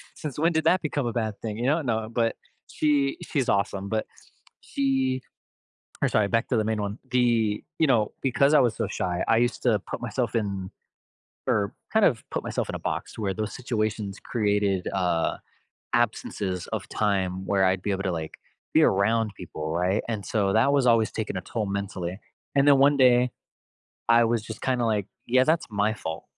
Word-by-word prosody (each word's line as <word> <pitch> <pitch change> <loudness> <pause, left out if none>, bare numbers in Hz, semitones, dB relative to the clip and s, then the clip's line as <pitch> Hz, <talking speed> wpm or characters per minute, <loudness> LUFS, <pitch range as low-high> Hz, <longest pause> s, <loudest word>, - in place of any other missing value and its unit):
"Since 150 -2 -6
when 165 +2 +3
did 160 0 +1
that 175 +2 +4
become 145 -3 -2
a 115 - -2
bad 110 -4 -2
thing?" 110 -1 -4
You 120 - 0
know? 155 +4 +2
No, 110 -4 -1
but 115 -1 0 0.4
she 145 -2 +1
she's 135 -5 -1
awesome, 100 -1 0
but 110 0 -1 0.6
she 135 -1 0 0.8
or, - - +4
sorry, 105 -2 +2
back 115 +3 +1
to 125 - +1
the 110 - +1
main 110 0 -1
one. 100 +2 -4
The 115 -4 +2
you 160 - +4
know, 115 -7 +2
because 140 +2 +3
I 150 - +7
was 120 -4 +2
so - - -1
shy, 90 -1 -2
I 115 - +4
used 120 +1 0
to 115 -4 +4
put - - -4
myself 120 +1 -2
in 100 -4 -2 0.8
or 100 -2 +1 0.2
kind 220 -2 +5
of 115 -7 +1
put - - -2
myself - - -2
in - - -4
a - - -5
box - - -4
where 100 -3 -1
those 110 0 -3
situations 110 -5 -2
created, 105 -4 0
uh, 90 -3 +1 0.6
absences 105 -5 -1
of - - -4
time 95 -3 0
where 95 0 +2
I'd 95 0 +2
be 105 - -2
able 95 0 -2
to, 95 - -1
like, 80 -2 -5 0.4
be - - +6
around 110 +3 +3
people, 80 -3 -5
right? 90 +5 +1
And 110 -4 -3
so, 100 -3 +1
that 115 +5 +4
was 140 -2 +3
always 115 -2 +4
taking 110 -3 -3
a - - -1
toll 110 +3 -3
mentally, 100 -2 -4 0.3
and 140 0 +4
then 140 - +7
one 140 +1 +5
day, 125 -1 +5 0.8
I 115 0 +6
was 115 -1 +1
just 110 0 -9
kinda 125 -2 +1
like, 105 -3 0 0.2
"Yeah, 130 +2 +4
that's 160 +3 +1
my 105 +1 +1
fault." 80 -6 -6
110 Hz, 195 wpm, -26 LUFS, 100-125 Hz, 0.8 s, I